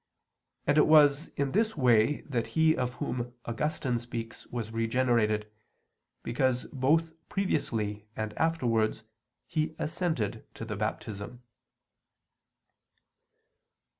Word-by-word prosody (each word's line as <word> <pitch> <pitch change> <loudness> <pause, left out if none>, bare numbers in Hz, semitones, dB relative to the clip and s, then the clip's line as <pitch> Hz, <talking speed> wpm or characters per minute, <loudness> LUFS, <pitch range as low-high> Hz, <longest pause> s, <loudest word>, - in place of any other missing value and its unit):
And 150 - +4
it - - +5
was 150 -1 +6
in 140 -1 0
this 220 -1 +1
way 125 +1 +4
that 120 -5 -2
he 160 0 +5
of 125 -1 -2
whom 120 -1 -3
Augustine 125 0 -1
speaks 115 -1 -7
was 115 -2 -4
regenerated, 115 -2 +1 0.7
because 125 +1 +1
both 160 +5 +2 0.2
previously 110 - -1
and 110 -1 -3
afterwards 115 -10 +1 0.4
he 155 0 -1
assented 150 - -1
to 115 - -6
the 110 -2 -4
Baptism. 105 +3 -4
125 Hz, 105 wpm, -29 LUFS, 115-150 Hz, 0.7 s, was